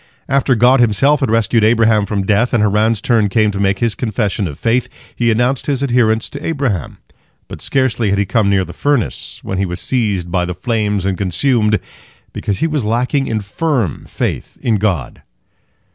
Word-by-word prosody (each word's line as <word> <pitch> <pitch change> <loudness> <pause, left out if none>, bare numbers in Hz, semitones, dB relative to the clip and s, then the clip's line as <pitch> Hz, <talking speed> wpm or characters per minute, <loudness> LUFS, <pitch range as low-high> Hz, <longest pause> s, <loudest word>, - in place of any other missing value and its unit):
After 135 -1 +2
God 125 +3 +4
Himself 130 +6 +3
had 135 -5 0
rescued 115 0 +2
Abraham 110 -2 +3
from 100 -2 -2
death, 110 +5 +2
and 110 - +3
Haran's 105 +1 +2
turn 110 -4 +2
came 110 +1 +2
to 100 - -5
make 95 -1 +1
his 115 +1 0
confession 105 -4 -2
of 75 -3 -8
faith, 120 +2 0 0.3
he 120 -1 +1
announced 120 +4 0
his 140 -2 0
adherence 120 -4 +2
to 140 +1 -8
Abraham. 135 - -2 0.5
But - - -9
scarcely 120 -5 0
had 100 - +1
he 100 - +1
come 100 +1 +1
near 95 -2 +2
the 85 - -10
furnace, 145 -5 -1
when 95 - -3
he 100 - +1
was 90 +1 -5
seized 100 -9 -1
by 90 -1 +1
the 90 0 -5
flames 105 -1 -1
and 95 -2 -1
consumed, 105 - +1 0.5
because 100 - -2
he - - +3
was 150 -5 -1
lacking 125 +5 0
in 110 -1 -1
firm 115 - -2
faith - - -4
in 115 -3 +2
God. 95 -9 -2
110 Hz, 190 wpm, -16 LUFS, 100-125 Hz, 0.5 s, God